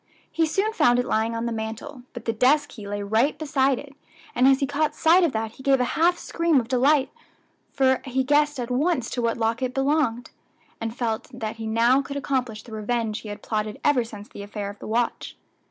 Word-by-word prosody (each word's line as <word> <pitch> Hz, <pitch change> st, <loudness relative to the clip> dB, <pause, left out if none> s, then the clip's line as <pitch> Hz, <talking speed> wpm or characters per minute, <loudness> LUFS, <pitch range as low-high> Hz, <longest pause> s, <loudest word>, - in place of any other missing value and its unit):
He 325 Hz, -1 st, +1 dB
soon 400 Hz, +7 st, 0 dB
found 245 Hz, -, +4 dB
it 245 Hz, -, +1 dB
lying 225 Hz, 0 st, 0 dB
on 230 Hz, +1 st, -2 dB
the 235 Hz, -, -2 dB
mantel; 225 Hz, +5 st, -5 dB
but 240 Hz, -2 st, -8 dB
the 230 Hz, -, 0 dB
desk 290 Hz, +6 st, +3 dB
key 210 Hz, -3 st, -10 dB
lay 205 Hz, 0 st, -3 dB
right 220 Hz, +8 st, +1 dB
beside 275 Hz, -3 st, +1 dB
it, 280 Hz, +1 st, -10 dB, 0.4 s
and 250 Hz, +2 st, +4 dB
as 270 Hz, 0 st, +5 dB
he 275 Hz, -, +1 dB
caught 295 Hz, +2 st, -1 dB
sight 340 Hz, +3 st, +5 dB
of 330 Hz, -, +2 dB
that 220 Hz, 0 st, -2 dB
he 250 Hz, -, -14 dB
gave 270 Hz, 0 st, +3 dB
a -, -, +3 dB
half 345 Hz, +2 st, +3 dB
scream 335 Hz, -4 st, +1 dB
of 230 Hz, -, -4 dB
delight, 265 Hz, +3 st, +3 dB, 0.6 s
for 260 Hz, -1 st, +2 dB
he 265 Hz, 0 st, 0 dB
guessed 295 Hz, +1 st, +2 dB
at 245 Hz, 0 st, -4 dB
once 270 Hz, -1 st, 0 dB
to 245 Hz, -, -2 dB
what 230 Hz, 0 st, 0 dB
lock 230 Hz, +1 st, 0 dB
it 255 Hz, -1 st, -2 dB
belonged, 270 Hz, -4 st, 0 dB, 0.5 s
and 225 Hz, +1 st, -5 dB
felt 225 Hz, -3 st, -2 dB
that 225 Hz, -3 st, -5 dB
he 225 Hz, -1 st, -5 dB
now 235 Hz, +4 st, +3 dB
could 280 Hz, +1 st, -6 dB
accomplish 250 Hz, -6 st, -2 dB
the 235 Hz, -, -14 dB
revenge 220 Hz, 0 st, -2 dB
he 215 Hz, -, -9 dB
had 205 Hz, 0 st, -8 dB
plotted 215 Hz, -1 st, -3 dB
ever 285 Hz, -5 st, +3 dB
since 210 Hz, -2 st, -10 dB
the -, -, -10 dB
affair 205 Hz, 0 st, -5 dB
of 205 Hz, -, -16 dB
the -, -, -8 dB
watch. 235 Hz, +2 st, -2 dB
245 Hz, 225 wpm, -24 LUFS, 225-280 Hz, 0.6 s, as